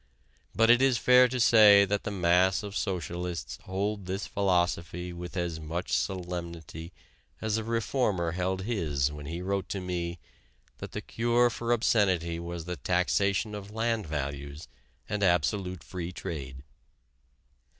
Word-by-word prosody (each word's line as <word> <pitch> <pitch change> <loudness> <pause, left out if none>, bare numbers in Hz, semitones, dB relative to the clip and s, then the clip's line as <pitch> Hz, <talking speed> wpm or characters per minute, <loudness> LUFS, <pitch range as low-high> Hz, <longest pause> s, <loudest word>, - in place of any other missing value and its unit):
But 115 +1 +5
it 120 +1 +5
is 135 -2 +4
fair 125 +2 +6
to 125 +1 -3
say 105 -4 +7
that 100 +1 -2
the - - -1
mass 95 0 +2
of 100 -1 -7
socialists 90 - -3
hold 100 +1 -2
this 95 +2 -3
philosophy 90 -2 0
with 90 +2 -7
as 85 -2 -2
much 80 +3 -4
solemnity 85 -3 -4 0.5
as 110 0 -1
a - - -4
reformer 115 -6 0
held 95 +1 -2
his 75 - 0
when 75 -1 -8
he 85 +3 -5
wrote 100 0 -2
to 100 - -2
me 85 -2 -3 0.6
that - - -8
the - - -4
cure 120 +1 +2
for 120 +1 -3
obscenity 95 -8 +2
was 85 -1 -6
the 90 0 -4
taxation 100 +4 +1
of 100 -1 -7
land 110 -2 -1
values 70 0 -5 0.4
and 105 0 -2
absolute 90 +1 +1
free 90 -1 -5
trade. 70 -7 -6
90 Hz, 145 wpm, -28 LUFS, 85-105 Hz, 0.6 s, say